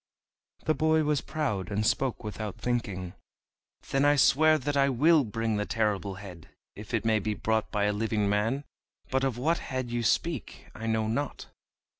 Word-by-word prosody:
The 155 - +3
boy 155 0 +2
was 150 -1 +1
proud, 110 - -2
and 105 +1 0
spoke 130 +2 0
without 105 -1 -5
thinking: 100 -7 -2 0.8
"Then 135 0 +2
I 145 0 +5
swear 155 +3 +5
that 145 +1 -2
I 140 0 +4
will 150 +4 +4
bring 115 -1 -2
the 105 - -1
Terrible 105 -4 -1
Head, 95 -4 -11 0.3
if 105 +2 -10
it 115 -2 -1
may 110 -1 +3
be 105 +1 -2
brought 110 0 0
by 105 -1 0
a 105 0 +2
living 105 -1 0
man. 110 +7 0 0.5
But 130 0 +1
of 130 -3 0
what 160 +7 +1
head 130 -2 -4
you 120 0 -1
speak 145 +4 -1
I 115 +2 -6
know 110 -1 +1
not." 140 +6 -3
115 Hz, 180 wpm, -28 LUFS, 105-140 Hz, 0.8 s, I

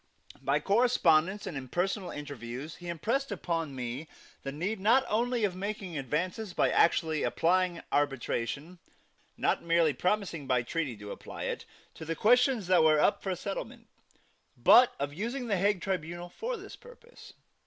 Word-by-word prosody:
By - - +1
correspondence 200 -5 +3
and 165 - -5
in 135 -1 -5
personal 185 - -1
interviews 140 0 -7
he 175 - -10
impressed 225 - -1
upon 165 -7 -2
me 125 +4 -5 0.3
the 135 - -4
need 185 +9 -3
not 235 +7 +4
only 240 +2 0
of 195 -3 +1
making 195 -2 -5
advances 180 - -2
by - - +3
actually 160 -2 +3
applying 180 0 +1
arbitration 145 +3 -1 0.6
not - - +1
merely 165 -2 +3
promising 180 -2 -1
by 125 -2 +2
treaty 140 -3 -3
to 105 0 -8
apply - - -8
it - - -3 0.3
to 160 +1 -5
questions 245 - +3
that 180 -2 +4
were 155 -1 +5
up 205 - +3
for 190 -2 -2
settlement, 195 +3 -6 0.7
but 250 0 +6
of 140 +1 -3
using 235 - -3
the 205 -4 0
Hague 200 0 +1
tribunal 175 -1 -3
for 465 - -4
this - - -10
purpose. 485 0 -15
175 Hz, 155 wpm, -30 LUFS, 150-210 Hz, 0.7 s, but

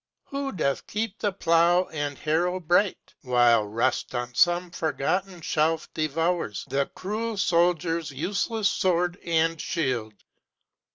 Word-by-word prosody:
who 275 0 -4
doth 145 - -1
keep 215 0 -3
the 205 - 0
plow 170 -1 +3
and 145 -2 -3
harrow 175 +4 0
bright, 180 +3 +1
While 120 -4 +4
rust 115 +4 -1
on 120 0 -3
some 175 +4 +2
forgotten 175 +4 -2
shelf 160 +1 0
devours 160 - -1
The 140 0 0
cruel 215 +3 -3
soldier's 170 -3 +1
useless 195 - -1
sword 180 -2 +1
and 165 -1 +1
shield. 125 -10 -2
170 Hz, 120 wpm, -26 LUFS, 145-185 Hz, -, While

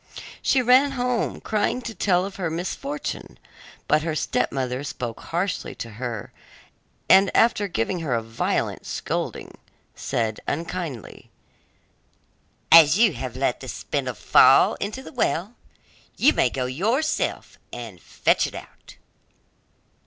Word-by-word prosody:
She 260 -2 +2
ran 260 +3 +5
home 250 -2 -1
crying 215 +3 0
to 230 - -5
tell 185 -4 +1
of 195 - -8
her 180 -4 -2
misfortune, 275 - -5 0.5
but 150 - +3
her 160 0 -2
stepmother 130 -3 -1
spoke 120 -5 -5
harshly 180 +3 -3
to 115 - -7
her, 115 -5 -5 0.7
and 195 0 +6
after 220 -3 +3
giving 170 - -2
her 145 -7 -1
a 115 - -2
violent 115 +1 -2
scolding, - - -4 0.3
said 110 -2 -2
unkindly, 165 - -5 1.4
'As 165 +1 +8
you 220 -5 +4
have 125 -1 -6
let - - 0
the - - -9
spindle - - -3
fall - - +5
into 215 +6 -4
the - - -11
well 215 -4 -1 0.6
you 300 +5 +5
may 125 - +2
go 130 +1 -3
yourself 225 - -1
and 115 -8 -8
fetch - - +1
it - - -10
out. - - -12
170 Hz, 130 wpm, -24 LUFS, -, 1.4 s, As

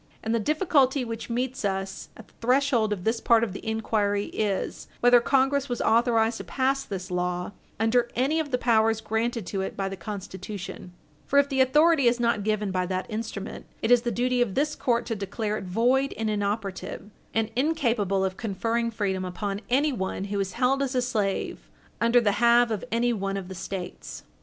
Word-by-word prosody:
And 225 - -1
the 230 - +2
difficulty 280 - +2
which 230 0 -6
meets 250 +2 -2
us 195 -1 -3
at 225 - -13
the - - -26
threshold 250 -3 +2
of 195 -4 -2
this 225 +2 0
part 230 -1 +4
of 215 -5 -2
the - - -8
inquiry 210 -2 0
is 205 -3 -2
whether 245 0 +6
Congress 270 +2 +2
was 245 - -2
authorized 230 0 +3
to - - -6
pass 270 +1 0
this 185 -2 -6
law 180 0 -2 0.3
under 235 +2 +2
any 275 +6 +1
of 310 -2 -2
the 250 - +1
powers 225 -2 +3
granted 225 0 -2
to 195 +1 -3
it 190 - -5
by 195 - -1
the 195 - -4
Constitution; 190 -1 -7 0.4
for 280 - +2
if 280 0 +5
the 265 -2 +2
authority 295 +1 +4
is 240 +1 +3
not 235 -3 +1
given 210 -1 0
by 185 -1 -1
that 185 0 -2
instrument, 215 -1 -5 0.2
it 225 - +1
is 245 -1 +7
the 240 - -1
duty 245 +2 +1
of 220 -6 0
this 300 +2 +1
court 240 -1 0
to 225 - -2
declare 210 +2 -3
it 205 - -5
void 245 +8 +2
and 220 -1 -1
inoperative, 205 -1 -3 0.2
and 225 -1 +1
incapable 235 - +1
of 190 0 -3
conferring 230 +2 -1
freedom 200 -4 -2
upon 195 +2 -4
anyone 250 -9 0
who 200 0 -3
is 190 -2 -2
held 265 +5 +2
as 270 -1 -1
a 250 - +3
slave 210 -6 -2 0.3
under 235 +1 +5
the 215 -4 +2
have 235 0 +5
of 215 - -2
anyone 225 -4 0
of 190 -2 -6
the - - -6
States. 185 0 -6
225 Hz, 195 wpm, -26 LUFS, 200-245 Hz, 0.4 s, is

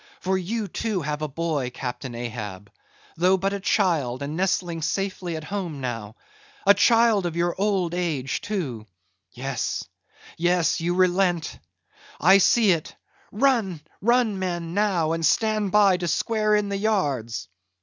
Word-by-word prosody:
For 190 +1 0
you 205 +4 -2
too 195 -1 -2
have 150 +1 -3
a 155 - -1
boy, 150 -3 -2
Captain 125 0 -6
Ahab—though 115 - -3
but 195 +2 -1
a 200 - -2
child, 160 - +1
and 145 +2 -4
nestling 175 -2 -1
safely 185 0 -2
at 155 - -5
home 175 -4 -4
now—a 120 - -2
child 225 -2 +4
of 165 - -5
your 170 0 +1
old 190 -4 0
age 155 -7 -2
too—Yes, 115 - -5 0.5
yes, 175 -1 +1
you 175 +1 0
relent; 180 -2 +1 0.6
I 190 +5 +6
see 215 +1 +4
it—run, 205 - -1 0.2
run, 235 -2 +2
men, 175 -3 -3
now, 190 -6 +1
and 165 0 -2
stand 215 +2 +2
by 200 -3 +5
to 175 -1 -3
square 215 +5 +1
in 210 -1 0
the 200 - -2
yards." 140 - -1
175 Hz, 135 wpm, -24 LUFS, 145-200 Hz, 0.6 s, I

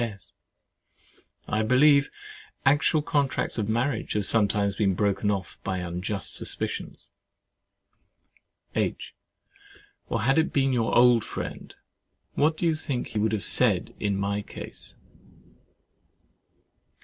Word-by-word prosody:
S. 105 -5 -5 1.2
I 110 - 0
believe, 140 +5 +4 0.6
actual 145 +2 +3
contracts 140 -5 0
of 105 -1 -2
marriage 120 +2 -1
have 105 -2 -1
sometimes 100 -1 +2
been 95 -2 +1
broken 100 +1 0
off 95 -3 -3
by 95 -1 -2
unjust 90 +3 -4
suspicions. - - -3 1.6
H. - - -2 1.0
Or - - -1
had 135 +6 +3
it 160 - 0
been 135 -1 +1
your 115 -2 +1
old 120 -2 +5
friend, - - -7 0.6
what 155 +2 +1
do 175 - -2
you 165 - +3
think 140 -5 -4
he 110 - -3
would 110 +1 +1
have 110 -3 -2
said - - +3
in 100 -2 -1
my 100 +1 -1
case? - - -10
110 Hz, 120 wpm, -26 LUFS, 100-135 Hz, 1.6 s, old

